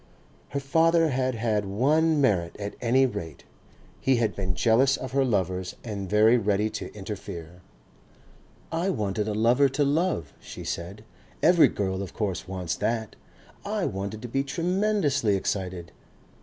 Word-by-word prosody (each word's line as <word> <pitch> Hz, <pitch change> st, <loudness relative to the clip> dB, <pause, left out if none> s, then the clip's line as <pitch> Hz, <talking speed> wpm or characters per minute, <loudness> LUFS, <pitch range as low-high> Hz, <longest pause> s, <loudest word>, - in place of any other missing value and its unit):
Her 140 Hz, -, -2 dB
father 165 Hz, +4 st, +3 dB
had 130 Hz, -2 st, 0 dB
had 110 Hz, -2 st, 0 dB
one 150 Hz, +10 st, +2 dB
merit 95 Hz, -11 st, +1 dB
at 100 Hz, 0 st, -5 dB
any 130 Hz, +3 st, +4 dB
rate. 80 Hz, -, -5 dB, 0.6 s
He 135 Hz, -, +2 dB
had 115 Hz, -2 st, 0 dB
been 95 Hz, -2 st, -2 dB
jealous 130 Hz, +6 st, +3 dB
of 130 Hz, -, -6 dB
her 135 Hz, +1 st, +2 dB
lovers 95 Hz, -6 st, -1 dB
and 100 Hz, -5 st, -5 dB
very 110 Hz, +3 st, +5 dB
ready 105 Hz, 0 st, +1 dB
to -, -, -6 dB
interfere. 85 Hz, +1 st, -7 dB, 1.1 s
"I 170 Hz, +4 st, 0 dB
wanted 105 Hz, -, -1 dB
a 105 Hz, -, -2 dB
lover 120 Hz, +6 st, +4 dB
to 135 Hz, +3 st, 0 dB
love," 160 Hz, -, 0 dB
she -, -, -9 dB
said. 95 Hz, +5 st, -5 dB, 0.4 s
"Every 170 Hz, +1 st, +7 dB
girl 95 Hz, -1 st, -2 dB
of 95 Hz, -, -7 dB
course 95 Hz, -5 st, -2 dB
wants 90 Hz, -3 st, -3 dB
that. 110 Hz, -2 st, -2 dB, 0.5 s
I -, -, -1 dB
wanted 100 Hz, +3 st, -4 dB
to -, -, -4 dB
be 135 Hz, +3 st, 0 dB
tremendously 165 Hz, -, +1 dB
excited.... 95 Hz, -3 st, -3 dB
110 Hz, 150 wpm, -26 LUFS, 95-140 Hz, 1.1 s, Every